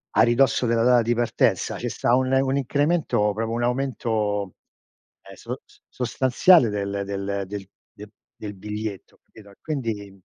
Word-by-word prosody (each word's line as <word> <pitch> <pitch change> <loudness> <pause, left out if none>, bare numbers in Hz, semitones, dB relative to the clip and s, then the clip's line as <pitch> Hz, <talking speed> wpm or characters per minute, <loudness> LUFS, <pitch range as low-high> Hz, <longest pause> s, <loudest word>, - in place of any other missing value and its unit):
A - - +5
ridosso 125 +2 +3
della 115 -1 +2
data 125 0 +5
di 115 +1 +1
partenza, 120 0 0
ce - - -3
sta 120 - +1
un 130 0 +1
un 135 +1 +2
incremento, 140 -6 +1
proprio 110 +2 -3
un 120 +1 -1
aumento, 110 -6 -1 0.7
ehm, - - -13
so - - -6
s - - -24
sostanziale 130 +4 +3
del 100 -1 -3
del 100 0 -3
del 100 0 -7 0.2
de 105 0 -11 0.3
del 105 -1 -7
biglietto, 105 0 -6
capito? 100 -2 -17
Quindi 105 -10 -5
115 Hz, 150 wpm, -24 LUFS, 100-125 Hz, 0.7 s, A